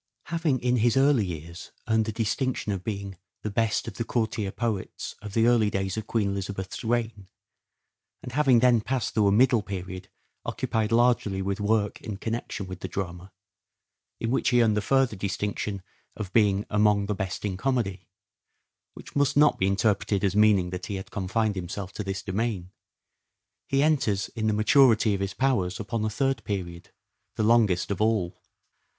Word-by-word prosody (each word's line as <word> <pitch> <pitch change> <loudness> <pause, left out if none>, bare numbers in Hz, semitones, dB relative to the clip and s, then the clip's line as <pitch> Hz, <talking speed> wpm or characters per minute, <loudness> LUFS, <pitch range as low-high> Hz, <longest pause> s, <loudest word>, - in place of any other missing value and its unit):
Having 160 -6 +1
in 125 0 +2
his 120 +2 +2
early 135 -7 +4
years 85 0 -8 0.2
earned 110 -1 +2
the 110 - -2
distinction 115 +1 -1
of 95 -2 -3
being 100 -3 -5
" - - -58
the 105 - -3
best 110 +1 0
of 105 - -7
the 115 - -1
courtier 110 -3 -1
poets 110 -4 -3
of 105 -1 -8
the 115 0 +4
early 115 -3 +4
days 95 -1 -2
of 110 -1 -5
Queen 105 -4 0
Elizabeth's 100 -1 -4
reign," 115 -4 -1 1.0
and 125 - -7
having 130 -3 +4
then 120 -3 +5
passed 125 -1 -2
through 105 -2 +3
a - - +4
middle 120 +2 +4
period 95 -2 -7 0.3
occupied 110 -1 -1
largely 115 -4 +2
with 100 +1 -2
work 105 0 0
in 105 -3 -6
connection 115 -2 -4
with 95 -1 -8
the - - -5
drama, 90 0 -5 0.9
in 115 - -2
which 135 - +2
he 120 -2 +4
earned 110 -2 +2
the 105 - +1
further 135 0 +2
distinction 100 0 -3 0.3
of 100 -4 -6
being 105 -2 +3
"among 105 -1 +3
the 105 - -1
best 95 0 -4
in 100 -2 -2
comedy" 100 -5 -1 0.4
— - - -53
which - - -12
must 145 0 +2
not 150 0 +5
be 95 - +2
interpreted 100 0 +1
as 100 -1 +1
meaning 105 -4 +4
that 90 - -5
he 100 - -3
had 95 - -7
confined 105 +1 0
himself 95 +2 -5
to 105 - -4
this 95 0 -4
domain 95 -2 -2 0.5
— - - -57
he 135 +1 +3
enters 120 -11 +1
in 110 -2 -3
the - - +3
maturity 110 0 +4
of 100 - -2
his 100 -1 -3
powers 100 -10 0
upon 110 +1 -3
a 110 - 0
third 135 +5 -1
period, 85 -4 -5 0.5
the - - 0
longest 105 -5 +3
of 100 - -2
all. 105 -5 0
105 Hz, 185 wpm, -26 LUFS, 95-115 Hz, 1.0 s, then